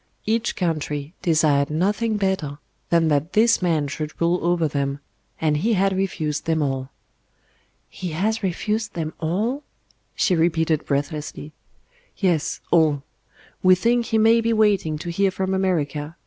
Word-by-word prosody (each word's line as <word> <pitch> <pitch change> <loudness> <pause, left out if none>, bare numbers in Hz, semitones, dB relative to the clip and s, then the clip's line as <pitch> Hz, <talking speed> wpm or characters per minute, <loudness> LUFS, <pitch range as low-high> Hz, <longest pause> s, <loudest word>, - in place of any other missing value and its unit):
Each 225 +2 0
country 155 -3 -2
desired 150 -4 +2
nothing 205 +7 0
better 190 -8 -1 0.3
than 165 -1 +3
that 150 +3 0
this 225 0 +4
man 160 -5 +1
should 150 +2 -6
rule 170 +1 +2
over 170 -2 +2
them; 140 -1 -2 0.4
and 155 -2 +1
He 225 +9 +1
had 195 -1 +2
refused 160 -6 -2
them 160 -2 +1
all. 135 -1 -2 1.0
"He 185 - -6
has 220 +7 0
refused 210 +3 -2
them 160 -2 -3
all!" 210 - -1 0.5
she 185 - +2
repeated 160 -2 +1
breathlessly. 145 +1 -3 0.7
"Yes, 175 -6 0
all. 155 -4 +3 0.6
We 185 0 +6
think 235 +4 +1
He 225 - +1
may 225 +1 +5
be 230 0 +1
waiting 205 -8 +2
to 170 +3 -5
hear 195 +3 +2
from 190 0 -2
America. 155 -5 -1
170 Hz, 145 wpm, -23 LUFS, 150-195 Hz, 1.0 s, We